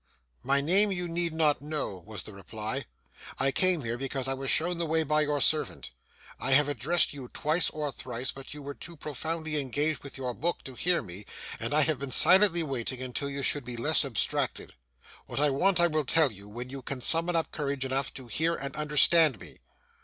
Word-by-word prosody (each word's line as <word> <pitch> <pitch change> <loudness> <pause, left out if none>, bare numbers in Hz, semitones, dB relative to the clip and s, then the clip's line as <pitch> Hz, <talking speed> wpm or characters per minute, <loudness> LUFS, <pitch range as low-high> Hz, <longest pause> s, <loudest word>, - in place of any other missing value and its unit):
'My 140 +2 +1
name 195 +7 +4
you 180 -2 -1
need 170 0 0
not 155 -3 +2
know,' 145 - -3
was 110 -1 -6
the 105 - -10
reply. 110 +6 -5 0.5
'I 135 0 +2
came 180 -1 +1
here, 120 +1 -3
because 135 -1 -3
I 135 - 0
was 135 0 -4
shown 170 +2 +1
the 170 - -1
way 160 +1 +2
by 155 0 +2
your 150 -1 0
servant. 155 +3 0 0.5
I 135 - +1
have 145 +2 +5
addressed 145 +6 +1
you 135 -3 -8
twice 155 +7 +1
or 150 -2 -3
thrice, 125 0 -5
but 135 0 -11
you 150 -1 -8
were 140 +1 -6
too 170 +3 -11
profoundly 155 +2 -3
engaged 145 +3 -1
with 140 - -9
your 125 -2 -3
book 170 +7 -2
to 130 - -8
hear 175 +6 +1
me, 95 +1 -10 0.3
and - - -2
I 150 +1 +4
have 150 -2 +1
been 140 -1 -4
silently 175 +3 +5
waiting 130 -3 -3
until 130 +2 -4
you 140 0 -4
should 145 0 0
be 120 0 -7
less 150 +8 +3
abstracted. 130 -7 -1 0.5
What - - -4
I 145 -1 +3
want 180 +7 +2
I 175 - +6
will 155 -3 0
tell 155 0 +4
you, 100 0 -12
when 120 +4 -7
you 135 0 -6
can 130 +1 -5
summon 165 +5 +3
up 165 - 0
courage 140 -3 -2
enough 135 +1 -1
to 130 - -8
hear 160 +8 0
and 140 -1 -5
understand 150 - +5
me. - - -12
145 Hz, 215 wpm, -29 LUFS, 130-160 Hz, 0.5 s, I